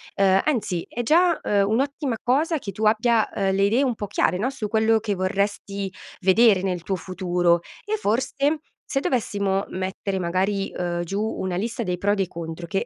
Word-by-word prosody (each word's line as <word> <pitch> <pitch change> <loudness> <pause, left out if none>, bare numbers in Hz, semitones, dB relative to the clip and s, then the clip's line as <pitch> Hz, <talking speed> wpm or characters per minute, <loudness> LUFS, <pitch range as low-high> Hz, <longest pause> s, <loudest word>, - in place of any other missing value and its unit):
ehm, 195 -1 +4
anzi 210 - -1
è 240 - -3
già, 335 +7 +3
uhm, 200 -1 +2
un'ottima 270 +1 0
cosa 305 +6 +1
che 200 -6 -6
tu 220 - -5
abbia, 220 +1 +3
uhm, 195 -1 0
le 195 - +1
idee 225 +7 +3
un 250 -3 0
po' 205 - -5
chiare, 180 -2 +1
no, 240 +7 0
su 220 -6 -4
quello 220 +1 +3
che 210 -2 -2
vorresti 195 +1 -2 0.3
vedere 195 +1 +5
nel 180 -3 -2
tuo 190 +2 -2
futuro, 175 -1 +1 0.2
e 430 - 0
forse 235 - 0 0.5
se 275 - 0
dovessimo 200 -7 0
mettere 190 +1 -3
magari, 190 +3 0
uhm, 175 -1 -1
giù 195 +4 -3
una 190 -4 -2
lista 230 +5 -2
dei 180 -4 -1
pro 205 +3 +1
e - - +3
dei 195 -2 0
contro 170 0 -7
che 195 +6 -1
200 Hz, 190 wpm, -24 LUFS, 185-230 Hz, 0.5 s, vedere